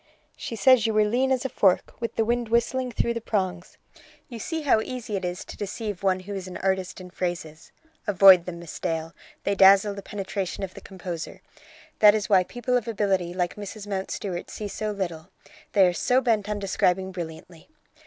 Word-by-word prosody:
"She 230 - -6
says 235 +1 +5
you 220 - -1
were 215 0 +4
lean 250 +5 +1
as 260 -1 +1
a - - +3
fork, 190 -5 +2
with 230 -1 -4
the 225 - +1
wind 240 0 0
whistling 245 +2 +1
through 235 0 0
the 230 - -4
prongs." 185 -5 -3 0.5
"You 235 -3 -7
see 320 +7 -3
how 260 -6 +4
easy 245 -3 -5
it 190 - -3
is 180 0 -4
to - - -9
deceive 205 -1 -5
one 190 -1 +1
who 200 +2 -7
is 190 -2 -5
an 180 - -7
artist 190 -1 -1
in 180 -1 -10
phrases. 170 -4 -5 0.4
Avoid 190 -3 +7
them, 180 -2 -6
Miss 170 -2 -9
Dale; 165 0 -3 0.3
they 200 - +1
dazzle 195 +1 +6
the 200 - -7
penetration 195 -1 -4
of 185 -1 -5
the - - -11
composer. 175 -3 -7 0.6
That 210 0 +8
is 215 +1 -2
why 190 -3 +5
people 245 +5 -2
of 240 -2 -4
ability 195 -5 0
like 180 0 -1
Mrs 210 0 -7
Mountstuart 190 -2 -4
see 210 - -5
so 215 +1 -4
little; 180 -4 -4 0.4
they 195 -2 +6
are 180 - +2
so 250 +9 +2
bent 220 -5 0
on 210 - -1
describing 190 -1 0
brilliantly. 170 - -9
195 Hz, 200 wpm, -25 LUFS, 180-220 Hz, 0.6 s, That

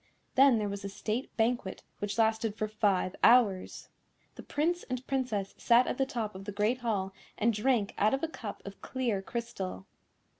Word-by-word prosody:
Then 270 -2 +6
there 210 -1 -1
was 200 0 -5
a 200 - -4
State 215 +5 -3
Banquet, 225 -4 0 0.2
which 205 +1 -3
lasted 220 -1 +2
for 215 -1 -2
five 205 -4 +1
hours. 220 -7 +4 0.4
The - - -10
Prince 345 +4 0
and 255 0 -4
Princess 245 -8 -2
sat 240 +2 +5
at - - -3
the 270 - +2
top 225 -5 -3
of 190 +1 -9
the 205 - -4
Great 210 +5 +1
Hall 200 -5 -1 0.2
and 230 +2 +2
drank 215 -1 +1
out 215 +5 +4
of 270 - -7
a - - +2
cup 230 -9 -8
of 200 0 -9
clear 240 -7 -1
crystal. 195 -4 -5
220 Hz, 185 wpm, -30 LUFS, 200-250 Hz, 0.4 s, Then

